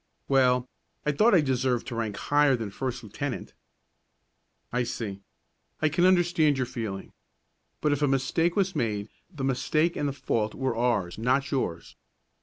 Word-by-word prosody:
"Well, 125 -2 +3 0.4
I 150 - +3
thought 210 +9 +4
I 170 - +6
deserved 130 -3 0
to 120 - -4
rank 110 -3 -2
higher 145 -2 +3
than 110 -4 -4
first 125 +2 -4
lieutenant." 125 +5 -5 1.2
"I 125 - +2
see. 110 -4 -4 0.6
I 155 - +2
can 175 +4 +2
understand 175 -5 +4
your 130 - 0
feeling. 115 -6 -5 0.7
But 150 - +2
if 145 0 0
a 145 - +3
mistake 135 +6 +1
was 190 -2 +1
made, 105 -6 -1 0.2
the 150 -7 -6
mistake 155 +5 +1
and 145 - 0
the - - -4
fault 115 -5 -1
were 130 -3 -1
ours, 115 -6 0
not 130 +4 +1
yours. 90 -11 -3
130 Hz, 160 wpm, -27 LUFS, 115-150 Hz, 1.2 s, I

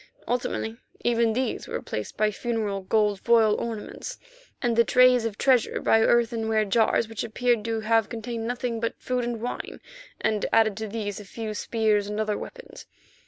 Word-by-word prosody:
Ultimately 235 -2 -2 0.2
even 235 -1 +2
these 255 0 -2
were - - -5
replaced 105 - -5
by 215 0 +2
funeral 215 -3 -2
gold 205 +1 +1
foil 225 -2 +4
ornaments, 230 - -5 0.4
and 240 -2 0
the 235 - +6
trays 250 0 +5
of 220 -2 -3
treasure 255 -4 +2
by 225 - +4
earthenware 225 -2 +2
jars 225 +2 +2
which 225 -1 -4
appeared 235 0 0
to 225 -1 -1
have 225 0 +2
contained 230 0 -4
nothing 245 -1 -2
but 230 0 -3
food 250 -1 -1
and 235 -1 -3
wine, 245 - -5 0.4
and 215 -2 0
added 220 -2 +4
to 220 - -4
these 205 -2 -4
a - - -8
few 215 +2 -6
spears 215 -2 +1
and 210 +1 -3
other 215 -1 0
weapons. - - -9
225 Hz, 170 wpm, -26 LUFS, 215-235 Hz, 0.4 s, the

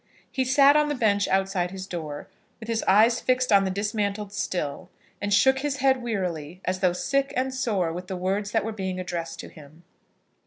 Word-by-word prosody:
He 260 - 0
sat 275 +2 +5
on 300 0 +3
the 295 - -1
bench 205 -5 +2
outside 190 -2 0
his 190 0 -7
door, 155 -5 -6 0.3
with 220 - -9
his 230 -1 0
eyes 220 +5 +5
fixed 255 -1 +1
on 200 -1 +5
the - - 0
dismantled 205 0 -2 0.2
mill, 150 -6 -3 0.3
and 205 - -2
shook 265 +6 +4
his 285 0 -2
head 265 -1 +2
wearily, 180 -8 -3
as 185 0 -1
though 185 -2 +3
sick 275 +9 0
and 260 +1 -1
sore 205 -10 -1
with 180 +2 -7
the 185 - -4
words 195 +3 -1
that 220 0 0
were 225 - -2
being 190 -3 -4
addressed 175 -2 -5
to - - -10
him. 155 +2 -15
200 Hz, 200 wpm, -25 LUFS, 185-245 Hz, 0.3 s, sat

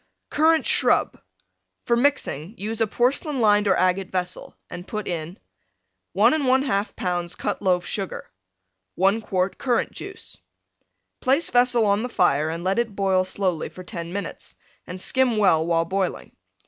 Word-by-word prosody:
CURRANT 320 +1 +3
SHRUB - - +2 0.6
For 235 - +2
mixing 235 - 0
use 220 +3 -4
a 225 - +3
porcelain 260 +6 0
lined 210 -2 +4
or 195 - +4
agate 185 +1 +1
vessel, 180 -1 -4
and 180 +1 -9
put 215 -2 -5
in: 170 +2 -4 0.8
1 215 +8 +4
1/2 260 -7 +1
lbs. 175 -1 -3
Cut 205 - -3
Loaf 180 -3 +1
Sugar. 195 -3 -4 0.7
1 195 +5 +2
quart 185 -2 -2
Currant 245 -3 0
Juice - - -9 0.8
Place 275 +5 +1
vessel 245 -2 +4
on 200 +1 +2
the 250 - -3
fire 150 - +2
and 165 +1 -5
let 190 +4 +1
it 225 -4 -2
boil 190 -2 +2
slowly 185 -3 -2
for 185 - -11
10 170 -2 -6
minutes, 200 +2 -6 0.3
and 180 +1 -7
skim 255 +3 +1
well 185 -6 +4
while 165 -1 +2
boiling. 190 +1 -3
200 Hz, 150 wpm, -23 LUFS, 180-235 Hz, 0.8 s, lined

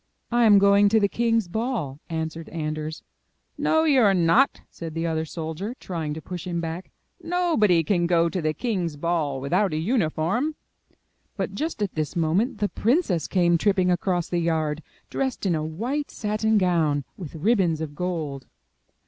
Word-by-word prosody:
I 240 0 +4
am 210 -2 +7
going 200 +1 +5
to 220 +2 +4
the 200 - +3
king's 230 -1 +1
ball," 185 - -3
answered 160 0 -4
Anders. 155 -1 -4 0.5
*'No, 320 0 +2
you 285 -5 +4
are 200 -3 +5
not," 180 +11 +3
said 165 -2 -7
the 165 +1 -1
other 160 -1 -1
soldier, 165 +8 -5
trying 160 -5 -4
to 160 - -7
push 180 -1 -6
him 170 -1 -2
back. 165 +2 -5 0.3
''Nobody 320 - +2
can 175 -2 +1
go 170 -1 +3
to 180 +1 -2
the 155 -1 -1
king's 180 -11 -2
ball 155 -4 -1
without 155 +8 +1
a - - 0
uniform." 205 - 0 0.8
But - - -2
just 310 -8 -2
at 200 - -3
this 155 +2 -3
moment 175 - +1
the 205 0 0
princess 215 - +1
came 175 -2 +2
tripping 190 -2 +2
across 175 -1 0
the 175 - -1
yard, 160 -2 0 0.3
dressed 265 -5 -2
in 185 - +2
a 155 -1 -1
white 235 - -3
satin 215 0 0
gown, 165 -7 +2
with 170 -5 -8
ribbons 175 -2 +2
of 155 -2 -5
gold. 155 -5 -4
175 Hz, 170 wpm, -24 LUFS, 160-215 Hz, 0.8 s, am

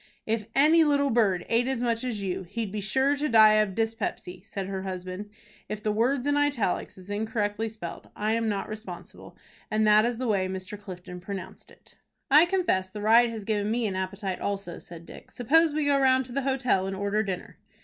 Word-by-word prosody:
"If 220 -1 -1
any 310 +4 +6
little 285 -2 +2
bird 200 -7 +2
ate 235 +2 +2
as 260 -2 -1
much 230 0 0
as 225 -5 -3
you, 185 -1 -2
he'd 210 +3 -5
be 210 0 -3
sure 265 +7 +2
to 300 +2 -1
die 220 -2 +7
of 205 -3 0
dyspepsy," 225 -5 -3
said 200 -2 -5
her 190 0 -4
husband. 185 +1 -6 0.4
If 210 0 -5
the 215 - +1
word 245 +5 +1
in 290 0 +2
italics 285 -13 0
is 185 +2 -10
incorrectly 215 0 -2
spelled, 210 -6 -8
I 215 +1 0
am 230 -1 0
not 200 -2 -2
responsible, 215 +2 -9 0.3
as 215 0 +1
that 215 0 +6
is 240 0 -1
the 255 0 -2
way 195 -4 +1
Mr. 185 +2 -6
Clifton 180 -2 -9
pronounced 190 +1 -8
it. - - -20 0.4
"I 305 +5 +7
confess 350 - 0
the 210 - -8
ride 230 +2 +6
has 225 -2 -6
given 210 -1 0
me 235 +1 0
an 195 -3 -2
appetite 190 0 -3
also," 200 -3 -3
said 170 -1 -11
Dick. - - -13
"Suppose 315 +7 +3
we 300 0 -1
go 285 -1 +3
round 260 -1 +3
to 250 - -12
the 275 +3 -1
hotel, 260 -8 +1
and 195 - -3
order 200 +2 0
dinner." 195 -4 -5
215 Hz, 210 wpm, -27 LUFS, 195-245 Hz, 0.4 s, die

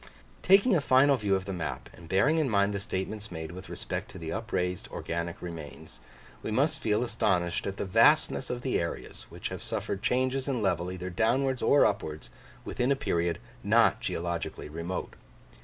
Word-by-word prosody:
Taking 195 +4 +5
a 160 - +3
final 140 +1 +5
view 105 -5 +1
of 95 0 -2
the 95 - -4
map, 85 -3 -4
and 85 -1 -14
bearing 145 - +3
in 150 -4 +1
mind 100 -1 +2
the 100 - -2
statements 105 +1 -4
made 80 -1 -5
with 95 +2 -9
respect - - -4
to - - -10
the 80 -1 -5
upraised 90 -5 -2
organic 85 0 -4
remains, 85 -4 -8 0.4
we - - -4
must 140 +7 +1
feel 110 0 +1
astonished 90 -7 0
at 100 0 -4
the - - -2
vastness 120 +6 +4
of 125 0 -3
the 130 - +1
areas, 85 - -5
which - - -5
have - - -6
suffered 100 - -3
changes 130 +2 +1
in 135 -4 0
level 90 -2 0
either 90 0 -5
downwards 130 +7 +1
or 145 - +5
upwards, 75 0 -2 0.3
within 125 +2 0
a - - +4
period 85 -9 0 0.3
not - - +4
geologically 85 -2 -3
remote. 85 +4 -4
100 Hz, 180 wpm, -29 LUFS, 85-130 Hz, 0.4 s, Taking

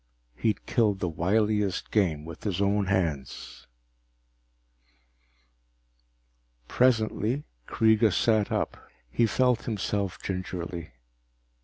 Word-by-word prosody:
He'd 110 - -1
killed 105 -5 +2
the 90 - -1
wiliest 100 +3 0
game 80 -8 +1
with 85 -1 -10
his 100 -4 -2
own 100 0 +1
hands. 80 -9 -2 3.0
Presently 120 +1 +1 0.2
Kreega 110 -1 +3
sat 110 +1 +2
up. - - -1 0.3
He 115 - +3
felt 125 0 +2
himself 100 -3 -2
gingerly. 90 -5 -5
100 Hz, 90 wpm, -27 LUFS, 90-110 Hz, 3.0 s, Kreega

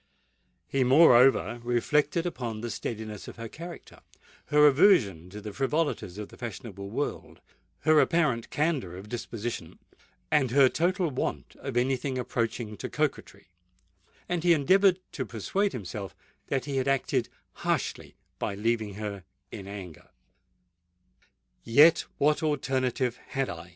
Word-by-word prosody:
He 135 -1 +1
moreover 125 -3 +5
reflected 145 +7 +1
upon 120 -10 -4
the 120 0 -4
steadiness 110 -2 -5
of - - -9
her 115 0 -7
character—her 155 -1 -3
aversion 135 - +4
to 105 +3 -8
the 105 0 -7
frivolities 135 - -1
of 105 -1 -6
the - - -15
fashionable 100 -4 -7
world—her 145 +4 -2
apparent 150 -11 +2
candour 145 - -1
of 100 +3 -10
disposition—and 120 +4 -4
her 135 +1 +5
total 175 +1 0
want 75 - -4
of - - -4
any 130 +2 +2
thing 130 +1 -3
approaching 115 -3 -3
to - - -5
coquetry;—and 90 - -6
he 175 -1 +6
endeavoured 185 +5 +4
to 135 - -3
persuade 190 - -1
himself 100 -3 -6 0.3
that 135 -2 -1
he 140 -2 -3
had 130 0 0
acted 135 -1 0 0.3
harshly - - -2 0.2
by 100 - -2
leaving 110 -1 -1
her 105 -2 -5 0.3
in 95 - -8
anger. 95 -6 -9 1.5
"Yet 145 +8 +6
what 150 +1 +2
alternative 130 -5 0
had 135 -2 -2
I?" 85 +1 -9
125 Hz, 125 wpm, -28 LUFS, 105-150 Hz, 1.5 s, he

